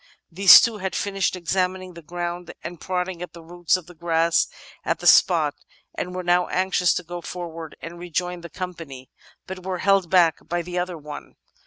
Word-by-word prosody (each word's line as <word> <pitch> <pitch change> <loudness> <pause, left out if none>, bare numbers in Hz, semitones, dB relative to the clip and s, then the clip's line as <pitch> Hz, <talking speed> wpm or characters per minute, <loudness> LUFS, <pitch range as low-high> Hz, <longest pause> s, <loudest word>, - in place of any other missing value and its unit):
These 190 +3 +9
two 225 -3 -1
had 190 -1 -3
finished 195 -2 -1
examining 185 +1 -2
the 170 - -11
ground 175 +2 -5
and 175 -2 -8
prodding 180 -1 -3
at 180 -2 -7
the 170 -1 -12
roots 175 +1 0
of 180 - -11
the 180 - -14
grass 165 0 +1 0.4
at - - 0
the - - -10
spot, - - +5 0.4
and 180 0 -5
were 185 - -4
now 175 0 +2
anxious 185 -1 +1
to 180 - -2
go 175 +1 -7
forward 165 -3 -7
and 170 +1 -8
rejoin 180 0 -3
the 170 - -9
company, 165 -9 -8 0.3
but 185 -1 -8
were 185 0 -3
held 195 -1 +2
back 175 -3 +4
by 175 0 -2
the 180 +1 -3
other 180 -1 -3
one. 150 -1 -10
175 Hz, 190 wpm, -23 LUFS, 170-185 Hz, 0.4 s, These